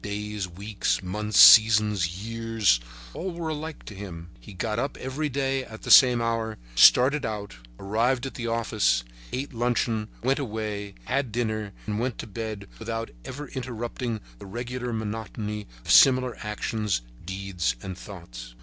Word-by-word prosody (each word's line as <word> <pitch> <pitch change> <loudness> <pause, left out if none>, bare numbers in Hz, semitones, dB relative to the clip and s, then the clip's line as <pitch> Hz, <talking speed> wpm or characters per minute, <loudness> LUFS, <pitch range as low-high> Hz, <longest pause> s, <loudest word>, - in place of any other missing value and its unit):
Days, 105 -1 -4
weeks, 100 +3 -2
months, 105 +3 -2
seasons, 105 -5 +7
years, 115 - +1 0.3
all 185 0 -4
were 170 -2 -3
alike 155 0 -6
to - - -8
him. 90 -4 -8
He - - -13
got 105 +4 -2
up 140 +3 -2
every 140 +4 -3
day 135 0 -1
at 110 -3 -11
the - - -1
same 125 -2 +8
hour, 115 -1 -1 0.2
started 130 - +6
out, 105 - -5 0.2
arrived 120 +6 0
at 135 - -5
the 120 -1 -4
office, 110 - +1 0.3
ate 135 +2 -4
luncheon, 115 -2 0 0.2
went 135 +3 +2
away, 105 -5 -4
had 130 -2 -1
dinner 110 -2 -2
and 105 -1 -2
went 120 -1 -2
to - - -6
bed 110 -1 -6
without 115 0 -4
ever 145 +1 -7
interrupting 120 -2 -4 0.2
the - - -10
regular 125 +3 -4
monotony 105 -1 -4 0.2
of - - -1
similar 130 -2 +6
actions, 105 - -2 0.2
deeds 95 -5 -2
and 95 -1 -5
thoughts. - - -10
110 Hz, 150 wpm, -26 LUFS, 100-125 Hz, 0.3 s, same